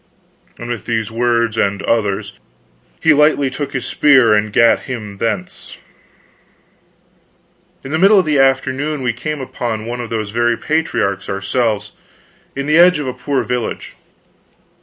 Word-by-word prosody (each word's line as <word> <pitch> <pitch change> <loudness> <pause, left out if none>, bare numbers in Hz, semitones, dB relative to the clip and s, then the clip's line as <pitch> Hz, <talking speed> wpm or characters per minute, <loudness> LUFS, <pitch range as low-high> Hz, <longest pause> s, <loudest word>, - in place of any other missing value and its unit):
And 120 - -8
with 120 -3 -5
these 115 -2 -2
words 115 -1 0
and 100 0 0
others, 105 -4 -1 0.6
he 160 - +4
lightly 145 -2 +3
took 140 +1 -5
his 130 -3 -3
spear 130 -7 +4
and 105 0 +1
gat 115 +2 +4
him 105 -5 -6
thence. 105 -5 -4 2.1
In 135 - -8
the 160 - 0
middle 200 +3 +6
of 190 - +3
the 150 -2 +1
afternoon 135 +2 0
we 120 -1 0
came 150 +4 -5
upon 115 -4 -4
one 120 +1 -4
of 120 - -7
those 110 -3 -3
very 120 +1 +1
patriarchs 150 - -1
ourselves, 100 +3 -1 0.6
in 140 0 -3
the 155 +3 +3
edge 180 -1 +6
of 150 - -4
a 130 - -3
poor 130 +2 -2
village. 125 -2 -4
120 Hz, 150 wpm, -17 LUFS, 110-140 Hz, 2.1 s, middle